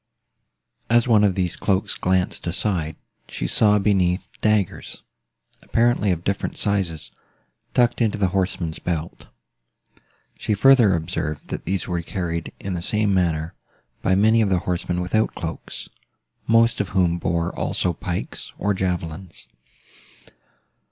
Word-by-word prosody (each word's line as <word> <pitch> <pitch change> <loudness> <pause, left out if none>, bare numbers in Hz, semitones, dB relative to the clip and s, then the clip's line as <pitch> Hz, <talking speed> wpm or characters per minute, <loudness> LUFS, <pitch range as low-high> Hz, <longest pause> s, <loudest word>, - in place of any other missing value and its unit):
As 120 +1 +4
one 110 -3 +5
of 100 -3 +3
these 90 -2 0
cloaks 95 -2 0
glanced 90 -1 0
aside, 85 -3 -1 0.3
she - - -4
saw, 105 - +5
beneath, 95 -3 +1
daggers, 105 -3 0 0.6
apparently 115 -3 +2
of 85 -1 -2
different 100 +1 -2
sizes, 95 -7 -1 0.6
tucked 120 0 +3
into 110 -2 +1
the 95 -2 +1
horseman's 90 -3 -1
belt. 85 -2 -4 1.1
She 105 - 0
further 120 -3 +6
observed, 80 -2 -4
that - - -5
these 95 +1 -1
were 85 -1 -1
carried, 85 -2 -4
in 100 - -4
the 85 - -3
same 105 +2 +1
manner, 85 -3 0 0.5
by 95 - +2
many 110 +3 +4
of 105 - +2
the 95 - +3
horsemen 90 0 -1
without 110 +5 0
cloaks, 80 -1 -6 0.6
most 115 0 +4
of 100 - -4
whom 85 -2 +2
bore 85 0 -1
also 90 - 0
pikes, 90 +1 -5
or 100 +2 0
javelins. 90 -2 -4
95 Hz, 130 wpm, -23 LUFS, 85-105 Hz, 1.1 s, further